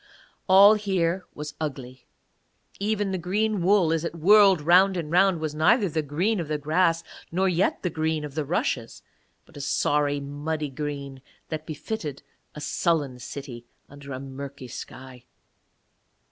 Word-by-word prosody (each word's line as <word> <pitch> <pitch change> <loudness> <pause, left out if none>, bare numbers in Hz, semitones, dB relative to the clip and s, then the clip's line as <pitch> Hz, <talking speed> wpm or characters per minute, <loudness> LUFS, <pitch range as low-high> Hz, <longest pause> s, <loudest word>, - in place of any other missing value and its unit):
All 200 +3 +8
here 190 -4 -1
was 150 0 -6
ugly; 130 -4 -6 0.7
even 205 -1 -1
the 185 - -2
green 205 +3 0
wool 180 -3 +3
as 165 -1 -1
it 170 - -4
whirled 195 +2 +6
round 180 +5 +4
and 160 -3 -4
round 180 0 +4
was 155 -1 -3
neither 195 +8 +3
the 160 -2 -1
green 175 +9 -1
of 165 - -3
the 150 0 -1
grass 165 +3 +1 0.3
nor 190 +3 +1
yet 180 +1 0
the 180 - 0
green 155 -1 -1
of 145 - -8
the 155 +1 -2
rushes, 130 -6 -2 0.4
but - - -16
a - - -6
sorry 145 +1 +1
muddy 145 +1 -4
green 140 -1 -5 0.3
that 155 -1 -5
befitted 155 -2 -5 0.3
a - - -7
sullen 145 -4 -1
city 125 -3 -8 0.2
under 140 0 -11
a 130 - -4
murky 135 0 -8
sky. 130 +1 -10
155 Hz, 155 wpm, -25 LUFS, 145-185 Hz, 0.7 s, All